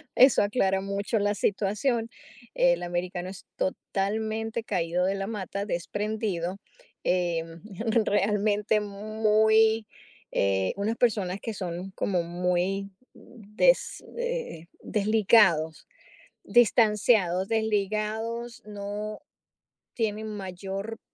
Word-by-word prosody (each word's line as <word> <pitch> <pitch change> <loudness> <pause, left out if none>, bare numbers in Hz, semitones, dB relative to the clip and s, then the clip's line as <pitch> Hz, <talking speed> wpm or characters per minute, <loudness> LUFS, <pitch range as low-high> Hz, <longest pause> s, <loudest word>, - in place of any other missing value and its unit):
eso 260 -3 +6
aclara 195 -3 +1
mucho 200 +3 -1
la 205 0 +1
situación. 215 +5 0 0.4
El 175 0 +3
americano 175 +1 -3
es 190 0 -10
totalmente 220 +4 -2
caído 180 -3 0
de 195 +1 +1
la 195 0 -3
mata, 200 -1 -4
desprendido, 205 -1 -2 0.5
eh, 175 -2 +1 0.6
realmente 210 +1 +2
muy, 215 +1 +2 0.5
eh, 95 -1 +1
unas 215 +3 -1
personas 200 -6 +1
que 225 - -4
son 185 0 -5
como 180 -3 0
muy 180 +3 -1 0.2
des 230 - 0
eh, 485 - -3 0.2
desligados, 205 -6 +3 0.6
distanciados, 210 -5 +3
desligados, 220 +2 -1
no 210 +1 -5 0.8
tienen 220 -1 -1
mayor 195 +2 -5
205 Hz, 90 wpm, -27 LUFS, 185-220 Hz, 0.8 s, eso